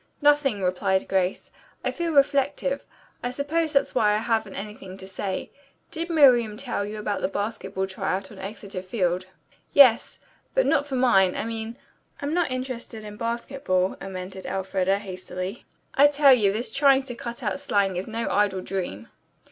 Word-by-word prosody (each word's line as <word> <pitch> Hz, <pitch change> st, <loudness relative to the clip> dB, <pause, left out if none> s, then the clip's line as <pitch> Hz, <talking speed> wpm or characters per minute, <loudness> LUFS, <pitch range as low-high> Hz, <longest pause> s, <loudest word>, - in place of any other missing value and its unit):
"Nothing," 290 Hz, -8 st, +3 dB
replied 190 Hz, +1 st, +1 dB
Grace. 190 Hz, -1 st, -1 dB, 0.3 s
"I -, -, +1 dB
feel 340 Hz, -1 st, -2 dB
reflective. 280 Hz, -1 st, +2 dB, 0.4 s
I 245 Hz, -, -2 dB
suppose 295 Hz, +5 st, -1 dB
that's 275 Hz, -, +2 dB
why 210 Hz, -4 st, +3 dB
I -, -, +2 dB
haven't 220 Hz, -2 st, -1 dB
anything 195 Hz, -2 st, -8 dB
to 190 Hz, -, -9 dB
say. 190 Hz, 0 st, -4 dB, 0.4 s
Did 335 Hz, +2 st, -3 dB
Miriam 245 Hz, -9 st, +5 dB
tell 245 Hz, -4 st, -2 dB
you 210 Hz, +1 st, -5 dB
about 210 Hz, -1 st, -2 dB
the -, -, +1 dB
basketball 200 Hz, -1 st, -3 dB
try 190 Hz, -1 st, -2 dB
out 195 Hz, 0 st, -9 dB
on -, -, -12 dB
Exeter 200 Hz, -1 st, -6 dB
Field?" 185 Hz, -2 st, -1 dB, 0.5 s
"Yes; 255 Hz, -5 st, +6 dB, 0.4 s
but -, -, +4 dB
not 285 Hz, 0 st, +2 dB
for 270 Hz, -, -3 dB
mine 195 Hz, -8 st, +4 dB
I -, -, -2 dB
mean 225 Hz, +1 st, -5 dB, 0.4 s
I'm 285 Hz, +2 st, -2 dB
not 350 Hz, -1 st, +1 dB
interested 255 Hz, -3 st, -5 dB
in 210 Hz, -1 st, -8 dB
basketball," 230 Hz, -4 st, -1 dB
amended 190 Hz, 0 st, -7 dB
Elfreda, 190 Hz, 0 st, 0 dB
hastily. 185 Hz, +1 st, -6 dB, 0.3 s
"I 285 Hz, +2 st, +7 dB
tell 290 Hz, -1 st, +6 dB
you 210 Hz, -6 st, +4 dB
this 225 Hz, +5 st, -3 dB
trying 275 Hz, -1 st, +4 dB
to 260 Hz, -2 st, -6 dB
cut 235 Hz, 0 st, -7 dB
out -, -, -1 dB
slang 200 Hz, -9 st, +1 dB
is 180 Hz, +2 st, -3 dB
no 230 Hz, +1 st, -3 dB
idle 200 Hz, -2 st, +1 dB
dream." 175 Hz, -, -4 dB
215 Hz, 170 wpm, -25 LUFS, 190-270 Hz, 0.5 s, I